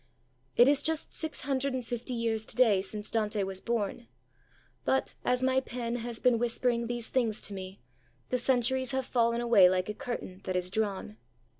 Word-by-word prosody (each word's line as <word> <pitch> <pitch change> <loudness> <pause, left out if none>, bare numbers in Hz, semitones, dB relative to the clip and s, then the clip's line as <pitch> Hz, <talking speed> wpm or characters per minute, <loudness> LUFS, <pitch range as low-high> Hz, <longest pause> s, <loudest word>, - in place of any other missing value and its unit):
It 240 - +7
is 285 0 +5
just 320 0 +1
six 315 -1 -2
hundred 275 -1 -1
and 250 -2 -4
fifty 240 +1 -3
years 225 -2 -1
to - - -5
day 220 -7 +4
since 210 +2 -4
Dante 210 -2 0
was 190 0 -4
born; 235 0 -2 0.8
but, 265 - 0
as 250 +1 +1
my 260 0 +3
pen 240 -2 -4
has 235 -1 -4
been 245 -1 +3
whispering 235 0 0
these 240 -1 -1
things 230 -5 0
to 205 - -6
me, 190 0 -7 0.5
the 250 - 0
centuries 260 +1 +1
have 265 -1 -1
fallen 235 -1 +1
away 220 -6 +6
like 185 +2 0
a - - -2
curtain 195 -5 -6
that 185 - -2
is 180 0 0
drawn. 195 - -2
235 Hz, 185 wpm, -30 LUFS, 210-250 Hz, 0.8 s, It